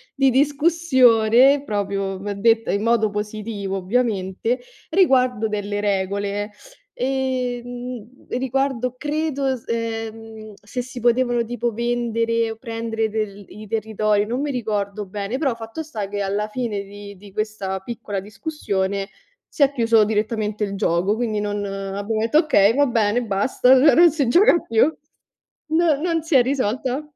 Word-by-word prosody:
di 270 -1 +4
discussione 275 -3 +4
proprio, 200 -4 -2
v 205 +2 -4
detta 225 +3 +2
in 200 +1 -1
modo 230 -2 +2
positivo 210 -1 -4
ovviamente, 205 +2 -1 0.3
riguardo 255 - +3
delle 205 -1 -3
regole, 200 +1 -1 0.4
ehm, 250 -2 -4
riguardo 255 -1 -1
credo 295 -1 -2
es 260 -3 -2
ehm, 225 -1 -5
se 230 +5 -4
si 250 0 -9
potevano 240 0 +2
tipo 240 0 -3
vendere 230 -1 0
o - - -6
prendere 225 -1 -3
del 205 -2 -4
i 215 +2 -11
territori, 215 -1 0
non 240 +4 -3
mi 290 0 -1
ricordo 210 -4 -3
bene, 200 +5 -4
però 270 -3 0
fatto 225 +7 -7
sta 220 -10 -5
che 205 +1 -4
alla 200 +2 -1
fine 215 -3 -3
di 200 0 -11
di 200 +1 -14
questa 205 -3 -3
piccola 215 -3 -5
discussione 200 -3 -3 0.4
si 290 - +1
è 275 - +4
chiuso 230 -4 +4
direttamente 215 0 -1
il 200 -1 -3
gioco, 190 +1 +1
quindi 220 -2 -1
non 205 0 -2
abbiamo 200 +2 -3
detto: 230 +7 +2
"Okay, 225 - +4
va 285 +1 +4
bene, 230 -2 +1
basta", 235 +5 +3
cioè 300 -3 +7
non 345 0 +7
si 285 -4 0
gioca 370 - +5
più. 225 -6 +2 0.8
Non 320 -2 +2
non 330 -1 0
si 325 -1 -1
è 260 - +8
risolta. 255 +1 -1
225 Hz, 145 wpm, -22 LUFS, 205-255 Hz, 0.8 s, è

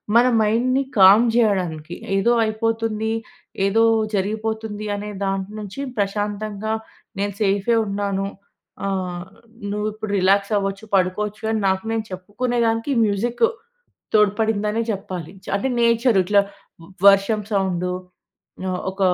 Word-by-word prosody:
మన 240 +2 +6
మైండ్‌ని 245 +5 +2
కామ్ 200 +5 +8
చేయడానికి. 180 -8 0 0.2
ఏదో 195 +5 +3
అయిపోతుంది.,ఏదో 220 -1 -1 0.3
జరిగిపోతుంది 215 +1 -2
అనే 205 +1 -5
దాని 195 +1 -2
నుంచి 205 +6 -7 0.2
ప్రశాంతంగా 205 +1 -2 0.5
నేను 200 0 -1
సేఫే 200 +3 +2
ఉన్నాను. 200 -1 -1 0.6
ఆహ్, 180 -2 -2 0.5
నువ్వు 210 +1 -1
ఇప్పుడు 215 -1 -6
రిలాక్స్ 195 +2 +3
అవ్వచ్చు, 195 +1 -3
పడుకోవచ్చు 205 +3 0
అని 220 - 0
నాకు 190 +1 +1
నేను 225 -1 -1
చెప్పుకునే 205 +7 -3
దానికి 225 +5 0
మ్యూజిక్ 220 - -1 0.7
తోడ్పడిందనే 210 +1 +2
చెప్పాలి. 185 -5 -6
చ - - -17
అంటే 235 +7 -1
నేచర్ 235 -1 +3
ఇట్లా 200 +2 +4 0.7
వర్షం 200 +2 +4
సౌండు 185 -2 0 0.8
ఆహ్, 185 -1 -2
ఒక 195 - -13
205 Hz, 115 wpm, -22 LUFS, 195-220 Hz, 0.8 s, కామ్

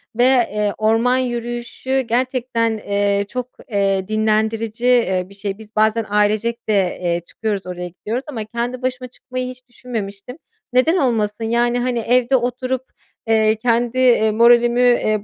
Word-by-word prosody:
ve, 240 - +3
eee, 210 -5 +2
orman 225 +4 +2
yürüyüşü 240 +1 -2
gerçekten, 240 -2 -1
eee, 200 -1 0
çok, 250 0 -4 0.2
eee, 195 -2 +1
dinlendirici, 220 +2 0
eee, 190 -7 +3
bir - - -14
şey. 200 -1 -4
Biz 220 0 -15
bazen 220 +1 +2
ailecek 215 +3 0
de, 215 - +3 0.3
eee, 170 -1 0
çıkıyoruz, 210 -2 -4
oraya 180 0 -5
gidiyoruz 220 +9 -5
ama 240 -7 -4
kendi 240 +3 -4
başıma 255 0 -3
çıkmayı 255 +1 -6
hiç 255 0 -11
düşünmemiştim. 230 0 -7 0.4
Neden 315 +8 +3
olmasın? 225 -5 0
Yani, 240 +2 +1
hani, 245 -1 -1
evde 245 +3 +2
oturup, 255 +1 -1 0.4
eee, 220 -1 +3
kendi, 235 +2 0
eee, 235 -4 +4
moralimi, 235 +2 +4
eee, 215 -4 +2
230 Hz, 145 wpm, -19 LUFS, 215-250 Hz, 0.4 s, eee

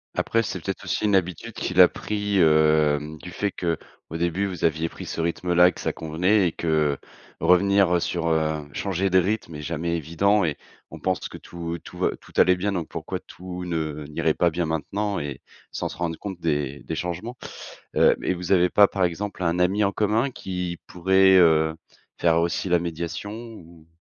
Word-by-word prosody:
Après, 115 0 +1
c'est 90 - -4
peut-être 95 +4 -4
aussi - - -1
une 105 -1 +3
habitude 95 +5 -1
qu'il 90 -2 -2
a 90 - +10
pris, 105 0 -2
hem, 75 -2 +3
du 90 +3 -10
fait 100 +1 -2
qu'au 85 -1 -5
début, 85 +3 0
vous 90 -4 -2
aviez 80 0 +1
pris - - -9
ce - - -4
rythme-là 90 +1 +3
et - - -4
que - - -13
ça - - -2
convenait 90 +5 +1
et - - -1
que 75 -4 0 0.4
revenir, 95 0 +4
heu, 85 - +1
sur, 85 -1 -2
heu, 80 -2 0
changer 95 +2 -1
de 95 0 +5
rythme 95 -3 -2
est 75 - -6
jamais 85 +2 -2
évident 90 +6 +2
et 80 -4 -1 0.3
on - - -10
pense 95 -1 -1
que - - -9
tout 85 -1 -6
tout - - -11
va - - +2
tout - - -18
allait 90 0 +5
bien, 100 +2 -1
donc 85 -4 -3
pourquoi - - -5
tout 90 0 -8
ne 80 -4 -3
n'irait 75 - +1
pas 85 - +2
bien 85 +1 -2
maintenant 100 +6 -2
et 70 -2 -4 0.3
sans - - -3
se - - -8
rendre 85 -2 -2
compte 95 -4 -7
des 75 -4 -1
des 80 - -4
changements. 90 - -4 0.6
Heu - - +5
et - - +1
vous 90 0 -5
avez 90 -1 +4
pas, 100 +2 +6
par 95 -2 +1
exemple, 95 +3 -4
un 85 +1 +1
ami 95 +4 +2
en 100 - +1
commun 110 +6 +1
qui 90 -6 -5
pourrait, 95 +1 +4
heu, 80 -3 +4 0.5
faire 85 -1 +3
aussi 85 +2 -1
la 90 0 +4
médiation 85 +4 -4
ou? 85 -9 -11
85 Hz, 200 wpm, -24 LUFS, 80-95 Hz, 0.6 s, a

